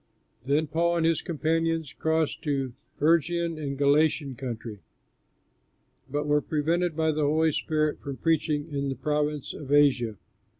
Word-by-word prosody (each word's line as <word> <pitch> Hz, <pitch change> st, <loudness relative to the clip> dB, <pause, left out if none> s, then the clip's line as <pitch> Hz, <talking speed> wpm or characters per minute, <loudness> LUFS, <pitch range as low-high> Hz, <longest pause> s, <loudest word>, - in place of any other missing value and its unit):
Then 145 Hz, +3 st, +2 dB
Paul 170 Hz, +3 st, +1 dB
and 165 Hz, -, +1 dB
his 165 Hz, -2 st, +2 dB
companions 165 Hz, -2 st, -1 dB
crossed 160 Hz, -1 st, 0 dB
the 140 Hz, -5 st, -1 dB, 0.3 s
Phrygian 170 Hz, +1 st, +1 dB
and 140 Hz, -2 st, -4 dB
Galatian 145 Hz, 0 st, +2 dB
country, 115 Hz, -4 st, -6 dB, 1.3 s
but 145 Hz, +2 st, -2 dB
were 150 Hz, 0 st, +2 dB
prevented 165 Hz, +3 st, 0 dB
by 160 Hz, 0 st, +2 dB
the 155 Hz, 0 st, -2 dB
Holy 155 Hz, +2 st, +3 dB
Spirit 155 Hz, 0 st, 0 dB
from 140 Hz, -2 st, -6 dB
preaching 155 Hz, -2 st, 0 dB
in 140 Hz, 0 st, -1 dB
the 135 Hz, -, -2 dB
province 150 Hz, -1 st, -1 dB
of 140 Hz, -2 st, -8 dB
Asia. 135 Hz, -6 st, +4 dB
150 Hz, 140 wpm, -27 LUFS, 140-160 Hz, 1.3 s, Asia